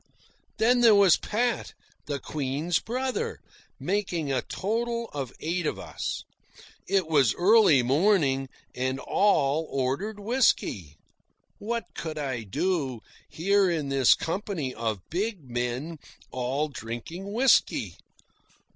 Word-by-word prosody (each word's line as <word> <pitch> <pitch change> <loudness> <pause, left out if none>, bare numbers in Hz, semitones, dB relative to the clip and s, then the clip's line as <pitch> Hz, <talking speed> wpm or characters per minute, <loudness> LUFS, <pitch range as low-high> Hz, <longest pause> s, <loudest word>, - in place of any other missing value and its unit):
Then 245 +2 +3
there 230 -3 +7
was 200 -4 +6
Pat, 235 +2 -2 0.3
the 145 -1 -2
Queen's 150 +4 -1
brother, 260 - -3 0.4
making 180 -7 -1
a 130 - +1
total 235 +3 -2
of 135 -4 -4
eight 170 +1 -1
of - - -2
us. - - -5 0.6
It 195 -2 +2
was 140 -7 +3
early 190 - +5
morning, 135 - +2 0.2
and 130 +1 -1
all 160 -6 +2
ordered 140 +12 -2
whisky. 200 - +1 0.6
What 230 +2 -2
could 160 -2 -5
I 135 -5 -3
do, 130 - -2 0.3
here 195 +3 +2
in 155 -5 -1
this 135 -2 +5
company 165 -7 -3
of 110 -5 -3
big 195 0 -2
men, 125 +6 -3 0.3
all 130 +4 -1
drinking 140 - -7
whisky? 250 +5 +3
160 Hz, 115 wpm, -27 LUFS, 135-205 Hz, 0.6 s, there